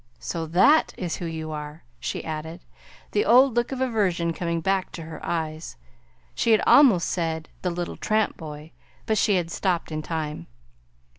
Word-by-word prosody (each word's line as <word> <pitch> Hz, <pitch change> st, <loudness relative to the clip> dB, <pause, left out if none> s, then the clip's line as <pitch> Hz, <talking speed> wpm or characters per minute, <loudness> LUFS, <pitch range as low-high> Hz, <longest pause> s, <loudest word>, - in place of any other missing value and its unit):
So 160 Hz, +8 st, -4 dB
THAT 195 Hz, -, +4 dB
is 175 Hz, -4 st, -3 dB
who 175 Hz, -, -4 dB
you 160 Hz, -1 st, -5 dB
are," 150 Hz, +1 st, -7 dB, 0.2 s
she -, -, -4 dB
added, 160 Hz, +2 st, -5 dB, 0.5 s
the 420 Hz, -, +2 dB
old 255 Hz, -, +5 dB
look 240 Hz, +1 st, +1 dB
of 260 Hz, -1 st, -3 dB
aversion 190 Hz, -9 st, +1 dB
coming 170 Hz, 0 st, -2 dB
back 190 Hz, +3 st, 0 dB
to 165 Hz, -, -7 dB
her 160 Hz, 0 st, -9 dB
eyes. 160 Hz, -1 st, -3 dB, 0.6 s
She 230 Hz, -, +2 dB
had 215 Hz, -, +4 dB
almost 240 Hz, -, +6 dB
said 160 Hz, -2 st, -2 dB
"the 180 Hz, -, 0 dB
little 175 Hz, 0 st, -4 dB
tramp 215 Hz, 0 st, 0 dB
boy" 150 Hz, 0 st, -9 dB, 0.3 s
but 220 Hz, -2 st, +1 dB
she 205 Hz, -, +3 dB
had 170 Hz, -2 st, -1 dB
stopped 175 Hz, -4 st, -1 dB
in 155 Hz, 0 st, -3 dB
time. 155 Hz, -, -4 dB
170 Hz, 170 wpm, -25 LUFS, 160-205 Hz, 0.6 s, almost